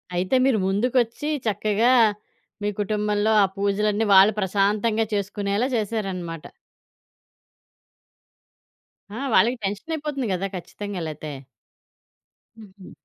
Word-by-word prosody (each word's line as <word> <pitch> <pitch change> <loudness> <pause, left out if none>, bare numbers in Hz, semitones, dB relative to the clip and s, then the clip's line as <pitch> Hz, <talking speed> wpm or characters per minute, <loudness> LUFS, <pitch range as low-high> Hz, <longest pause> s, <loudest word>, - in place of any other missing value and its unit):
అయితే 185 +7 0
మీరు 260 -5 +3
ముందుకొచ్చి 235 +6 0 0.2
చక్కగా, 215 +3 +2 0.7
మీ 205 - +1
కుటుంబంలో 210 +1 0
ఆ - - +5
పూజలన్నీ 205 +2 0
వాళ్ళు 195 +3 +7
ప్రశాంతంగా 210 +3 +1
చేసుకునేలా 200 +3 -1
చేసారనమాట. 190 -7 -3 2.6
ఆ! 210 - -8 0.2
వాళ్ళకి 240 +4 +4
టెన్షనయిపోతుంది 280 +6 -3
గదా! 190 +2 -2
ఖచ్చితంగా. 200 +1 -7
లేతే. 155 0 -7 1.3
హుహు. 195 -3 -14
205 Hz, 85 wpm, -23 LUFS, 195-225 Hz, 2.6 s, వాళ్ళు